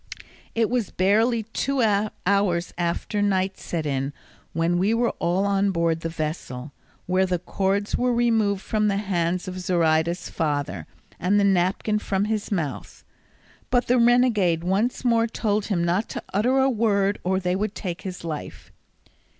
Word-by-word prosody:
It 225 -1 +2
was 245 -5 0
barely 220 +5 +2
two 255 +4 -1 0.4
hours 185 -3 +1
after 175 +4 -1
night 190 -1 0
set 165 -3 -4
in 135 0 -2 0.4
when 165 +2 +1
we 205 +5 +2
were 235 0 +1
all 180 +3 +1
on 200 0 +2
board 170 -3 +1
the 165 - -4
vessel, 150 -4 -5 0.3
where 185 +1 +2
the 180 -1 0
cords 195 +3 -1
were 250 0 +1
removed 225 -5 +1
from 215 -1 0
the 200 -1 +1
hands 180 -2 -1
of 185 0 -5
Zoraida's 170 -1 +1
father, 145 - -2 0.3
and 195 +4 +2
the - - +3
napkin 195 +2 +2
from 200 -1 -1
his 215 -1 -2
mouth; 160 -8 -4 0.7
but 245 -1 +2
the 250 +1 +3
renegade 235 -9 +3
once 205 +8 0
more 230 -1 +3
told 210 -2 -1
him 185 -5 0
not 180 +5 0
to - - -5
utter 240 +7 +2
a 265 0 +4
word, 210 -5 +1
or 190 +1 +1
they 180 -1 0
would 205 +1 -2
take 180 -4 -5
his 185 -3 -7
life. 155 -3 -7
195 Hz, 160 wpm, -24 LUFS, 175-215 Hz, 0.7 s, a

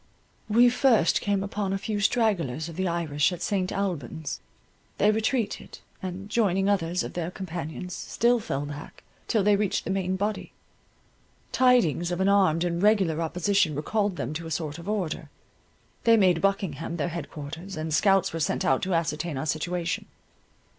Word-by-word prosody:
We 235 +3 +6
first 245 - +3
came 200 -2 0
upon 200 -1 -2
a - - 0
few 210 +1 -3
stragglers 190 - +1
of 165 - -8
the 185 +1 -1
Irish 165 -3 +1
at 175 -1 -5
St. 185 -2 0
Albans. 160 -6 -3 0.6
They 210 - +4
retreated, 220 +1 -1 0.2
and, 185 +1 -5
joining 200 -4 +1
others 180 -3 +1
of - - -6
their 170 -1 -2
companions, 180 -1 -6
still 240 +5 +1
fell 145 -9 -3
back, 145 +1 -9 0.2
till 215 -3 +2
they 205 +1 +5
reached 200 -1 0
the - - -2
main 190 -1 0
body. 205 +3 -3 1.0
Tidings 240 - +3
of 175 - -2
an 190 +1 +3
armed 185 -5 +3
and 170 0 -1
regular 195 -6 +3
opposition 180 0 +1
recalled 200 +6 0
them 135 -1 -3
to 165 +1 -5
a - - -6
sort 155 -1 -3
of 170 - -7
order. 195 -7 -2 0.8
They 230 -1 +6
made 180 -5 +4
Buckingham 175 -4 -1
their 165 +2 -1
head 170 -3 -5
quarters, 155 +5 -7
and 155 0 -3
scouts 195 +3 +3
were 165 - -3
sent 150 - 0
out 135 - +3
to 185 -1 0
ascertain 160 -1 -1
our 135 - -3
situation. 170 +3 -2
180 Hz, 170 wpm, -26 LUFS, 160-200 Hz, 1.0 s, We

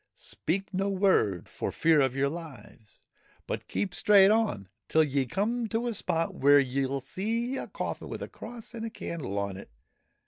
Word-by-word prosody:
Speak 195 +5 -3
no 195 +2 0
word, 185 - +2
for - - -4
fear 160 -2 +4
of 130 -1 +1
your 135 +1 +2
lives, 140 -9 -10 0.4
but - - -4
keep 195 -3 -2
straight 200 -1 +6
on 215 - +1 0.2
till 160 - +4
ye 140 -3 0
come 225 - -1
to 225 +2 -1
a 240 - -1
spot 165 -5 -1
where 145 +1 +5
ye 135 0 0
'11 135 +1 -2
see 225 - -2
a - - -4
coffin - - -5
with - - -5
a - - -5
cross 230 -1 -10
and 230 -1 -6
a 225 - -3
candle 160 - -5
on 100 -1 -2
it. 95 - -11
165 Hz, 185 wpm, -29 LUFS, 135-215 Hz, 0.4 s, straight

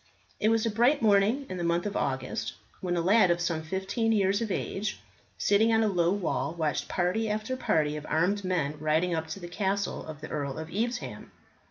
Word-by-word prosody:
It 215 - +3
was 225 0 +2
a 225 - +1
bright 245 +5 +3
morning 215 +6 +3
in 185 - -5
the 175 - -3
month 170 +2 +1
of 205 - -3
August, 130 -2 -2 0.3
when 175 -1 -1
a - - +2
lad 190 +2 +5
of 175 0 +2
some 170 -2 -1
fifteen 190 +7 -1
years 200 0 +2
of 225 - -2
age, 200 +2 -2 0.4
sitting 220 +3 +3
on 225 0 +4
a - - +3
low 175 -4 +2
wall, 190 -4 -1
watched 155 -5 -1
party 190 +5 0
after 215 +4 -2
party 150 -11 +1
of 150 0 -6
armed 195 +5 +1
men 160 -5 -1
riding 155 +4 +1
up 160 -1 -2
to 160 +5 -6
the 175 - -7
castle 195 +2 -1
of 155 -2 -7
the 155 - -8
Earl 140 -2 -3
of 160 0 -6
Evesham. 240 +4 -3
185 Hz, 210 wpm, -28 LUFS, 160-215 Hz, 0.4 s, lad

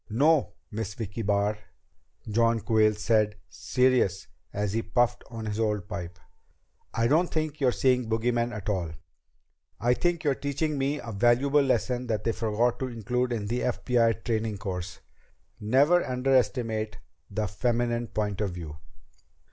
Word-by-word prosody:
"No, 140 +1 +3 0.2
Miss 105 -2 -4
Vicki 110 0 -5
Barr," 105 0 +1 0.7
John 115 +1 +2
Quayle 110 -2 +3
said 105 0 +2
serious 125 -7 +1 0.3
as 105 -1 -2
he 115 - +1
puffed 120 +1 +1
on 115 -1 -6
his 105 0 -3
old 105 -4 0
pipe, 90 -4 -6 0.7
"I 115 - 0
don't 160 +8 +3
think 155 -1 -2
you're 130 -2 +4
seeing 125 -2 +1
bogeymen 120 +1 +1
at 105 -4 -7
all. 90 -6 -1 0.9
I 120 +3 +3
think 175 +4 0
you're 145 -3 +3
teaching 140 +2 -2
me 140 +2 0
a 115 - -7
valuable 120 +7 +3
lesson 125 -2 0
that 110 -2 -1
they 115 - +1
forgot 115 +2 0
to 130 - -2
include 125 +1 -2
in 110 -4 -2
the 120 +4 -1
FBI 120 -2 +1
training 110 -2 -1
course 90 -4 -5 0.6
never 140 +11 +4
underestimate 125 -4 0 0.3
the 105 +1 -2
feminine 120 +3 0
point 105 -2 -2
of 105 - 0
view." 80 -4 -7
115 Hz, 150 wpm, -27 LUFS, 105-125 Hz, 0.9 s, you're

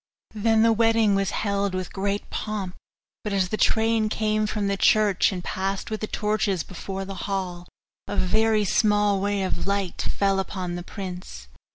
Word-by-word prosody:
Then 220 +1 +3
the 230 0 +5
wedding 225 -2 +3
was 195 -1 +1
held 200 -3 -1
with 185 -1 -4
great 200 +1 -2
pomp, 205 -4 -3 0.5
but 210 - -2
as 190 -2 +1
the 215 - -1
train 220 0 +2
came 215 0 0
from 210 -1 -1
the 200 - +1
church, 205 -1 +4
and 180 -2 -5
passed 195 +4 -3
with 215 - -3
the 215 - -2
torches 210 -6 0
before 195 +1 -6
the 195 +1 -6
hall, 180 -3 -3 0.4
a - - -3
very 215 +2 +2
small 205 -1 +3
ray 200 0 0
of 185 -1 -2
light 200 -2 -1 0.2
fell 195 -1 +2
upon 185 -2 -3
the 175 - -4
prince. 180 - -7
200 Hz, 175 wpm, -25 LUFS, 190-215 Hz, 0.5 s, the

